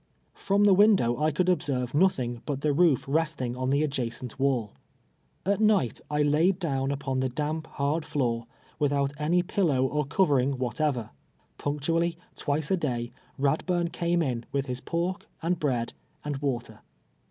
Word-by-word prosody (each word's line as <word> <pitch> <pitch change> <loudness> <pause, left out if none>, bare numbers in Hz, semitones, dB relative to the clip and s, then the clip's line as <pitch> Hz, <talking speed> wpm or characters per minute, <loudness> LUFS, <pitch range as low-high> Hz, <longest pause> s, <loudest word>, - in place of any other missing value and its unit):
From 200 +1 +1
the 205 -1 +6
window 195 - +5
I 155 - +4
could 165 +4 0
observe 135 -8 0
iiothing 130 -8 +1
but 140 -2 -2
the 150 -1 +2
roof 160 -4 +3
resting 145 -5 0
on 130 0 -2
the 140 +2 +2
adjacent 125 -4 -3
wall. 130 -6 +1 0.7
At 200 +2 +1
night 205 - +2
I 150 0 +1
laid 160 +6 +3
down 135 -7 -1
upon 135 -2 -2
the 130 0 0
damp, 155 +4 -3
hard 145 +3 -1
ilooi*, 115 -5 -1 0.3
without 140 -1 +1
any 170 +4 +2
pillow 165 -8 +1
or 150 +1 -1
covering 140 -6 +2
whatever. 125 -1 -1 0.5
Punctually, 165 +4 0 0.2
twice 150 +2 -1
a 190 - +3
day, 120 -7 -2 0.3
Eadburn 170 +5 +1
came 170 0 +1
in, 125 -5 -2
with 140 -1 0
his 125 -1 -4
pork, 175 +2 -2 0.2
and 175 +1 0
bread, 125 -6 -1 0.3
and 145 -2 -2
water. 135 -4 -3
145 Hz, 155 wpm, -27 LUFS, 130-170 Hz, 0.7 s, the